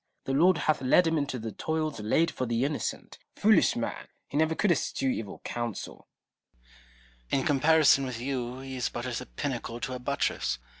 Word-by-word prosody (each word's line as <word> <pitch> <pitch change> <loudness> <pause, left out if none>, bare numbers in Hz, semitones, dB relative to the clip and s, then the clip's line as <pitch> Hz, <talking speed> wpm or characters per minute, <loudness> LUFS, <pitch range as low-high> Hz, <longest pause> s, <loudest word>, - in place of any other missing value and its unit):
The 135 - -2
Lord 175 +5 +5
hath 155 -3 +1
led 135 +7 +5
him 165 0 +1
into 145 -4 -1
the 110 -1 -5
toils 155 +2 -2
laid 160 +11 +2
for 130 - -3
the 120 +2 +1
innocent. 145 +1 -4 0.2
Foolish - - +4
man! - - -4 0.2
he - - -9
never 160 +2 +2
could 205 +1 +2
eschew 135 -4 0
evil 110 -5 -5
counsel. 120 -3 -5 1.2
Noble. 135 - +2
In - - -4
comparison 150 -1 +5
with 125 -3 -5
you, 125 0 -3
he 135 -1 -6
is 125 - 0
but 120 - -5
as 125 -2 -3
a - - -9
pinnacle 120 -4 -4
to 130 - -3
a 125 - -4
buttress. 125 - -1
135 Hz, 190 wpm, -28 LUFS, 120-155 Hz, 1.2 s, Lord